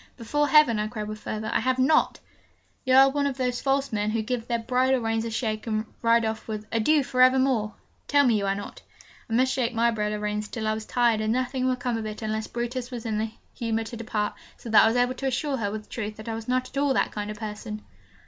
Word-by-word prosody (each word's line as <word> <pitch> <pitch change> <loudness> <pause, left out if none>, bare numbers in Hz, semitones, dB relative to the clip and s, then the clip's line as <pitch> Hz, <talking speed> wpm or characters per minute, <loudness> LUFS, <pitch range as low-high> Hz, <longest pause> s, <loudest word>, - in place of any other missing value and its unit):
'Before 295 +5 0
Heaven,' 290 -8 +5
I 210 - 0
cried 215 -2 -5
with 215 0 -6
fervour, 215 0 -4
'I - - +3
have 255 +2 0
not!' 265 +5 +3 0.7
'You 260 0 +4
are 270 +1 +9
not 270 - 0
one 285 -1 +1
of 275 -2 -3
those 250 -2 -1
false 275 -2 0
men 210 0 0
who 220 0 -1
give 235 0 -3
their 235 - 0
bridle 255 +3 +1
reins 225 -1 -1
a - - -2
shake, 220 -1 -3
and 215 0 -1 0.2
ride 230 0 +4
off 220 0 -3
with 215 -1 -5
"Adieu 280 +7 +3
for 255 0 0
evermore!" 255 -4 +3 0.3
tell 285 0 +4
me 230 -4 +3
you 200 - -1
are 195 - +1
not?' 205 - -8 0.5
I - - -3
might 255 +3 +4
shake 250 -2 -1
my 235 +1 +3
bridle 210 -1 -1
reins 210 0 -2
till 225 -1 -5
I 215 - +2
was 220 0 -6
tired 235 -3 +2
and 215 0 0
nothing 255 +1 0
would 255 -1 0
come 245 -2 -1
of 220 -1 -4
it 215 +1 -7
unless 220 0 -2
Brutus 240 +1 -4
was 240 -3 -7
in 215 -2 -1
the 220 +1 -1 0.2
humour 225 -1 -1
to 225 +2 -8
depart; 220 -2 -2 0.2
so 230 - -8
that 220 - +8
I - - +5
was 225 - +1
able 245 +1 +2
to 270 +1 -3
assure 270 +2 -1
her 205 -4 -1
with 215 +1 -6
truth 215 -2 -5
that 215 +1 -11
I 225 - -2
was 225 0 -6
not 255 0 0
at 275 - -9
all 280 -2 +2
that - - +1
kind 210 0 -4
of 210 - -6
person. 210 0 -6
230 Hz, 265 wpm, -26 LUFS, 215-255 Hz, 0.7 s, are